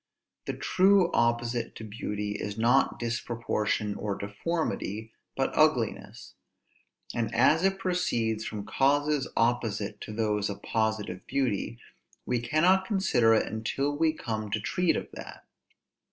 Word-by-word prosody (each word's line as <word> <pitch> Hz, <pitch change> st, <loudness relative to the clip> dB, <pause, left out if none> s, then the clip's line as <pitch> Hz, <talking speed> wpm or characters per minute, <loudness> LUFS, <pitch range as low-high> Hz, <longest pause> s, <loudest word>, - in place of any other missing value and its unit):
The -, -, -2 dB
true 190 Hz, -1 st, +4 dB
opposite 120 Hz, 0 st, 0 dB
to -, -, -8 dB
beauty 105 Hz, -1 st, -4 dB
is 105 Hz, 0 st, -4 dB
not 120 Hz, +4 st, +3 dB
disproportion 115 Hz, -3 st, -1 dB
or 100 Hz, -1 st, -3 dB
deformity, 110 Hz, -, -3 dB, 0.2 s
but -, -, 0 dB
ugliness: -, -, +1 dB, 0.8 s
and 115 Hz, -2 st, -1 dB
as 150 Hz, +8 st, +4 dB
it 195 Hz, 0 st, +2 dB
proceeds 120 Hz, -, 0 dB
from 105 Hz, -2 st, -5 dB
causes 145 Hz, +1 st, +2 dB
opposite 110 Hz, -3 st, 0 dB
to -, -, -7 dB
those 105 Hz, -2 st, 0 dB
of 100 Hz, 0 st, -7 dB
positive 110 Hz, -4 st, -2 dB
beauty, 120 Hz, -4 st, -1 dB, 0.5 s
we 125 Hz, -1 st, 0 dB
cannot 175 Hz, +10 st, +3 dB
consider 125 Hz, -, +3 dB
it -, -, +2 dB
until 135 Hz, +6 st, -2 dB
we 160 Hz, +1 st, +3 dB
come 110 Hz, -8 st, -4 dB
to 110 Hz, -, -1 dB
treat 180 Hz, -, +1 dB
of -, -, -3 dB
that. -, -, -10 dB
115 Hz, 130 wpm, -28 LUFS, 105-145 Hz, 0.8 s, true